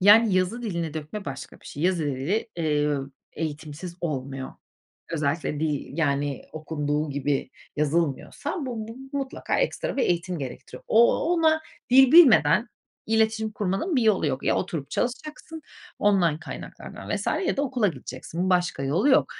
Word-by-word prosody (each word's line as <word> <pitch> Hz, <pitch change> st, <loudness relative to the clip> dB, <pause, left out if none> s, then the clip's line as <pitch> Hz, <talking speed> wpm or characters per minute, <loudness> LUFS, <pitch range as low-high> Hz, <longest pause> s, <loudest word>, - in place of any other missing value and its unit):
Yani, 205 Hz, +1 st, +7 dB
yazı 185 Hz, +7 st, +1 dB
dilini 170 Hz, -7 st, -3 dB
dökme 160 Hz, +6 st, -5 dB
başka 135 Hz, -1 st, -7 dB
bir -, -, -15 dB
şey. 145 Hz, -, -6 dB
Yazı 175 Hz, -2 st, +2 dB
dili, 145 Hz, -, -1 dB
ııı, 150 Hz, -3 st, 0 dB, 0.2 s
eğitimsiz 155 Hz, +2 st, -5 dB
olmuyor. 135 Hz, -4 st, -4 dB, 0.6 s
Özellikle 150 Hz, -1 st, -1 dB
dil, 150 Hz, -1 st, -2 dB
yani, 145 Hz, -3 st, 0 dB
okunduğu 150 Hz, -1 st, -2 dB
gibi 140 Hz, -1 st, -1 dB, 0.3 s
yazılmıyorsa 150 Hz, -, -1 dB
bu 235 Hz, -6 st, -4 dB
bu 265 Hz, +4 st, -6 dB
mutlaka 270 Hz, -1 st, -2 dB
ekstra -, -, -1 dB
bir 270 Hz, -, +2 dB
eğitim 175 Hz, 0 st, 0 dB
gerektiriyor. 130 Hz, -4 st, -8 dB
O 235 Hz, +2 st, +5 dB, 0.2 s
ona 320 Hz, -2 st, +3 dB, 0.3 s
dil 265 Hz, +1 st, +7 dB
bilmeden 235 Hz, -, +7 dB, 0.4 s
iletişim 220 Hz, 0 st, +1 dB
kurmanın 205 Hz, -, -1 dB
bir 245 Hz, -, +3 dB
yolu 215 Hz, -7 st, +3 dB
yok. 130 Hz, -2 st, -2 dB
Ya -, -, +2 dB
oturup 145 Hz, -5 st, -3 dB
çalışacaksın, 305 Hz, +5 st, -4 dB, 0.4 s
online 180 Hz, -7 st, +3 dB
kaynaklardan -, -, -9 dB
vs. -, -, -5 dB, 0.2 s
ya -, -, 0 dB
da 280 Hz, -, +1 dB
okula 250 Hz, -6 st, +1 dB
gideceksin, 160 Hz, +5 st, -4 dB
başka 180 Hz, -6 st, +1 dB
yolu 160 Hz, -, +2 dB
yok. 265 Hz, -, +5 dB
175 Hz, 145 wpm, -25 LUFS, 145-225 Hz, 0.6 s, Yani